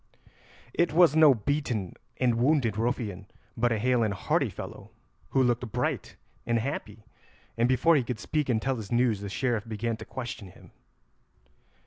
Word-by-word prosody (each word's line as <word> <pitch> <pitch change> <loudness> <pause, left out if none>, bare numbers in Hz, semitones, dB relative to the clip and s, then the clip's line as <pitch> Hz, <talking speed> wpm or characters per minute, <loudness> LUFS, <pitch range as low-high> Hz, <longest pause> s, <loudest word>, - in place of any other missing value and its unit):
It 170 -3 +1
was 170 -3 +5
no 155 -4 +7
beaten 120 - -2 0.2
and 120 -3 +1
wounded 125 -5 +2
ruffian, 110 -4 -2 0.3
but 120 +1 +1
a 115 - +1
hale 125 +2 +2
and 105 -3 0
hearty - - 0
fellow, - - -9 0.4
who 135 - +3
looked 120 -1 0
bright - - -2 0.3
and 120 0 0
happy, 110 -4 -4 0.5
and 120 +1 +2
before 160 +6 +4
he 140 - +3
could 120 -2 -4
speak 150 +4 -1
and 115 -3 +2
tell 135 +3 -1
his 110 -1 -8
news 120 -3 +2
the 100 - -5
Sheriff 115 0 -1
began 115 +1 -2
to - - -9
question 120 -5 -6
him. 90 - -16
120 Hz, 165 wpm, -28 LUFS, 110-130 Hz, 0.5 s, no